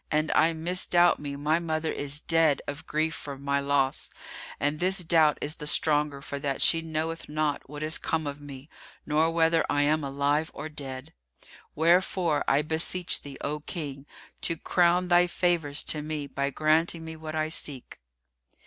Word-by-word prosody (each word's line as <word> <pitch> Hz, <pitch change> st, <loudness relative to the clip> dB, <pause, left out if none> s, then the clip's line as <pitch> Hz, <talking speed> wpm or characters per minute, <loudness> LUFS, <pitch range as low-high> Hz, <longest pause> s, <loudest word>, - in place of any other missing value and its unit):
And 155 Hz, 0 st, +1 dB
I 165 Hz, +1 st, +4 dB
misdoubt 175 Hz, +1 st, +2 dB
me 145 Hz, -1 st, -5 dB
my 150 Hz, +3 st, +1 dB
mother 160 Hz, -1 st, -2 dB
is 145 Hz, +1 st, -3 dB
dead 165 Hz, -4 st, +3 dB
of 145 Hz, +2 st, -7 dB
grief 155 Hz, +1 st, 0 dB
for 140 Hz, -3 st, -7 dB
my 140 Hz, +1 st, 0 dB
loss; 140 Hz, -1 st, 0 dB, 0.5 s
and 145 Hz, +2 st, 0 dB
this 185 Hz, +1 st, +1 dB
doubt 160 Hz, -3 st, +4 dB
is 150 Hz, +2 st, -2 dB
the 150 Hz, -, -7 dB
stronger 150 Hz, -2 st, +2 dB
for 140 Hz, -1 st, -5 dB
that 140 Hz, -1 st, -2 dB
she 165 Hz, -, +4 dB
knoweth 160 Hz, 0 st, -4 dB
not 150 Hz, -2 st, -2 dB
what 150 Hz, +1 st, -6 dB
is 155 Hz, +1 st, +2 dB
come 160 Hz, -1 st, -1 dB
of 145 Hz, 0 st, -5 dB
me 140 Hz, -1 st, -10 dB, 0.4 s
nor 155 Hz, +2 st, +2 dB
whether 165 Hz, 0 st, +3 dB
I 145 Hz, 0 st, +2 dB
am 155 Hz, +1 st, +2 dB
alive 140 Hz, +3 st, 0 dB
or 155 Hz, +2 st, -6 dB
dead. 140 Hz, 0 st, -8 dB, 0.6 s
Wherefore, 170 Hz, 0 st, +2 dB
I 140 Hz, +2 st, +3 dB
beseech 160 Hz, +3 st, -1 dB
thee, 140 Hz, -1 st, -9 dB
O 150 Hz, +1 st, -3 dB
King, 145 Hz, -3 st, -6 dB, 0.3 s
to 165 Hz, -, 0 dB
crown 175 Hz, +2 st, +2 dB
thy 175 Hz, 0 st, +4 dB
favours 170 Hz, -5 st, 0 dB
to 150 Hz, -, -1 dB
me 150 Hz, -1 st, -4 dB
by 140 Hz, 0 st, -2 dB
granting 160 Hz, +3 st, +1 dB
me 160 Hz, 0 st, -7 dB
what 155 Hz, 0 st, -7 dB
I 155 Hz, 0 st, 0 dB
seek." 140 Hz, -4 st, -5 dB
155 Hz, 175 wpm, -27 LUFS, 145-165 Hz, 0.6 s, I